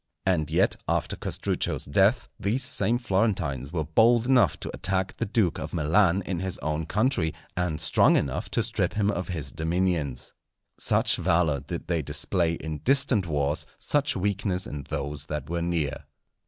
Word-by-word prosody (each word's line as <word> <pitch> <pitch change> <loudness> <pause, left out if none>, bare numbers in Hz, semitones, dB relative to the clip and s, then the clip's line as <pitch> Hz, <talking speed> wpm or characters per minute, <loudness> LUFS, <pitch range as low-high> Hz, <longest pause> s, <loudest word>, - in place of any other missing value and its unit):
And 80 -5 +1
yet, 85 +4 +2
after - - -1
Castruccio's - - -2
death, 100 - +2
these 115 +7 0
same 120 +2 +2
Florentines 95 - -1
were 85 -3 -1
bold 115 +9 +3
enough 125 -3 +3
to - - -4
attack 95 0 -1
the - - -3
Duke 100 -5 +1
of - - -5
Milan 90 +4 +3
in 90 -2 -2
his 95 0 -3
own 75 +1 -3
country, 105 - +1 0.2
and 90 -3 -1
strong 80 - +4
enough 70 -2 -1
to - - 0
strip - - -1
him 105 -1 +2
of 90 -2 -3
his 80 -6 -4
dominions. 80 -5 -1 0.5
Such - - +3
valour 85 -4 +2
did 85 +6 -6
they 85 -2 0
display 85 +3 0
in 80 -2 -5
distant 135 -7 +2
wars, 75 -1 -1
such 145 0 +1
weakness 95 -1 -1
in 70 -2 -7
those 70 +1 -3
that 75 0 -5
were 85 0 -1
near. 85 -4 -2
90 Hz, 165 wpm, -26 LUFS, 75-100 Hz, 0.5 s, strong